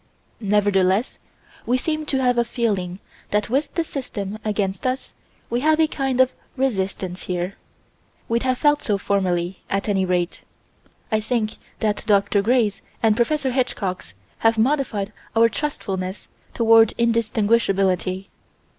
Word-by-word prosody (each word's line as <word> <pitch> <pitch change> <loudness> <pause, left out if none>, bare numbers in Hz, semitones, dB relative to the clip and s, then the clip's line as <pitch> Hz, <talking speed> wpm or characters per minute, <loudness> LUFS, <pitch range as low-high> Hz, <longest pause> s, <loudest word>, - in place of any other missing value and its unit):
Nevertheless 205 0 +2 0.5
we 250 +2 +3
seem 310 +3 -2
to 270 - 0
have 245 -1 +3
a - - +4
feeling 205 -7 -1 0.3
that 210 +1 0
with 280 +4 +1
the 335 - +1
System 215 -9 -5
against 200 0 -1
us 255 +1 -3 0.3
we 240 - -1
have 310 +3 +3
a 320 - +6
kind 270 -4 -2
of 260 0 +4 0.2
resistance 195 -7 -1
here. 180 +1 -2 0.7
We'd 230 +1 +1
have 255 -1 +1
felt 295 +1 +3
so 205 -3 0
formerly, 185 -2 0
at 195 +2 -1
any 195 -2 +2
rate: 180 -1 -1 0.7
I 215 - +3
think 220 -1 -1 0.2
the 215 -1 +2
Dr. 200 -1 +3
Grays 220 -2 +2 0.2
and 220 -2 +4
Prof. 285 +6 +1
Hitchcocks 205 - -2 0.2
have 225 0 +3
modified 220 -5 0 0.2
our 230 +1 +6
trustfulness 195 -9 -4 0.3
toward 225 -1 +5
indistinguishability. 205 -5 +1
215 Hz, 135 wpm, -22 LUFS, 195-250 Hz, 0.7 s, a